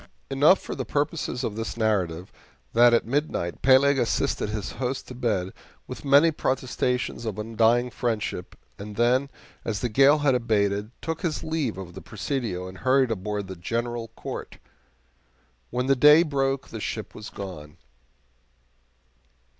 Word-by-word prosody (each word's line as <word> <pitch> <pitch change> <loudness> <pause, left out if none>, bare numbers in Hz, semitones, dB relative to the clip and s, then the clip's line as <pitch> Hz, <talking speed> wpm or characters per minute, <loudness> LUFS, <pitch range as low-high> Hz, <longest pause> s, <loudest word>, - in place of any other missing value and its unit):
Enough 145 +8 +5
for - - -6
the - - -3
purposes 145 -3 -2
of 105 - -2
this 115 +1 -4
narrative 95 -6 -1 0.4
that 120 +1 +6
at 120 - +3
midnight 130 - -2
Peleg 135 +1 +5
assisted 115 -3 0
his 105 -2 -4
host 130 +1 -2
to - - -8
bed 105 -7 -1 0.3
with - - -8
many 145 +4 +5
protestations 125 -4 -1
of 110 -4 -4
undying 115 +3 +2
friendship, 115 -4 -3 0.2
and 105 +1 -8
then, 125 +4 +2 0.3
as 105 -3 -3
the 125 - 0
gale 135 +6 +5
had 145 -2 +2
abated, 105 -4 +1
took 165 0 -3
his 170 -5 -2
leave 155 - -2
of 90 -2 -8
the 95 - -9
Presidio 110 -5 -3
and 95 0 -10
hurried 130 -1 +3
aboard 105 0 -3
the 95 0 -7
GENERAL 115 +5 -3
COURT. - - -7 1.1
When 125 +1 -1
the 135 +1 +3
day 150 +5 +7
broke 135 -3 -1
the 110 - -6
ship 110 +1 -5
was 105 - -8
gone. 85 -6 -8
120 Hz, 150 wpm, -25 LUFS, 105-135 Hz, 1.1 s, day